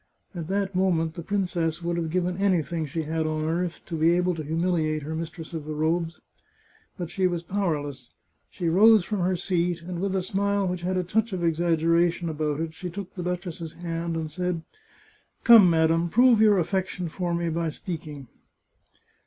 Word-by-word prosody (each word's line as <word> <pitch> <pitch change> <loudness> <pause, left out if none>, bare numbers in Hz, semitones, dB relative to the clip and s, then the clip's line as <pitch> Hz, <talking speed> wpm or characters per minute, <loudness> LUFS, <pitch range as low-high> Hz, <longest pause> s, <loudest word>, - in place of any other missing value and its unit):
At 170 -4 -5
that 195 +1 -1
moment 175 -4 +1
the 170 - -7
princess 175 -3 -1
would 170 0 -1
have 165 -2 -2
given 180 +1 0
anything 170 -5 0
she 160 +3 -3
had 160 +1 -1
on 155 0 -1
earth 170 +2 -2
to 165 - -5
be 165 +2 +3
able 180 0 +1
to 165 - -5
humiliate 160 -1 0
her 155 +2 -4
mis 160 0 -3
tress 165 0 -10
of 160 -3 -5
the 155 0 -5
robes. 165 +2 -1 0.8
But 175 -3 -5
she 185 +1 +1
was 175 -2 -3
powerless. 150 -9 -2 0.4
She 175 - -4
rose 205 +3 +6
from 210 -1 -2
her 185 +1 +1
seat, 175 -1 -1
and 175 0 -5
with 195 0 -1
a 190 - 0
smile 200 +1 0
which 180 -1 -3
had 185 +1 -1
a 180 - +1
touch 220 +4 0
of 180 -2 -2
exaggeration 170 +1 +2
about 150 -1 -2
it 165 -1 -3
she 180 +2 -6
took 190 +1 -7
the 180 - -6
duchess's 175 -2 -4
hand, 170 -1 -4
and 160 -1 -3
said: 180 0 -2 0.4
" - - -34
Come, 225 -6 +9
madam, 165 +1 +2
prove 240 +3 +5
your 210 -2 +6
affection 180 0 -1
for 175 +1 -2
me 170 0 -1
by 165 0 -1
speak 165 +1 -6
ing!" 145 -3 -9
170 Hz, 195 wpm, -26 LUFS, 160-185 Hz, 0.8 s, Come